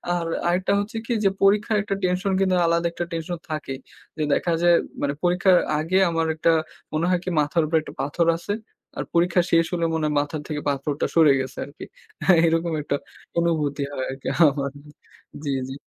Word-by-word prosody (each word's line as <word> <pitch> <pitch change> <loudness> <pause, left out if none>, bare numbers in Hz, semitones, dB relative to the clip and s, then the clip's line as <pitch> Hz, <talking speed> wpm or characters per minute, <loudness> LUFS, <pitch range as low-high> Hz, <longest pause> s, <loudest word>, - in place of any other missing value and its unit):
আর 170 -1 -2 0.2
আরেকটা 185 +3 +1
হচ্ছে 205 +2 -4
কি? 240 - -1
যে 195 - +5
পরীক্ষার 210 +2 +3
একটা 200 -1 -2
টেনশন 185 +2 0
কিন্তু 185 -1 +2
আলাদা 170 +1 +2
একটা 175 0 -4
টেনশন 165 +1 -3
থাকেই, 150 -4 -4 0.4
যে 155 - 0
দেখা 170 +3 +1
যায় 175 0 +6 0.3
মানে 140 0 0
পরীক্ষার 180 +1 +4 0.2
আগে 165 +5 +1
আমার 165 -1 0
একটা 165 +1 +3 0.4
মনে 155 +2 +1
হয় 180 -1 +2
কি - - -3
মাথার 150 +3 +1
উপরে 160 +1 +2
একটা - - -10
পাথর 155 +4 0
আছে, 205 +4 -4 0.4
আর - - -1
পরীক্ষা 175 +1 +3
শেষ 165 0 +4
হলে 170 -1 0
মনে 160 -1 0
হয় 150 - -1
মাথা 145 +2 -4
থেকে 150 -2 -3
পাথরটা 140 +1 -1
সরে 160 -4 +6
গেছে 130 0 -5
আরকি। 140 - -11 0.6
এরকম 165 0 0
একটা 145 - -1 0.4
অনুভূতি 155 -4 0
হয় 130 - -3
আরকি 135 0 -8 0.2
আমার। 140 -1 +1 0.7
জি, 145 - -1 0.2
জি। - - -5
165 Hz, 185 wpm, -23 LUFS, 150-180 Hz, 0.7 s, যায়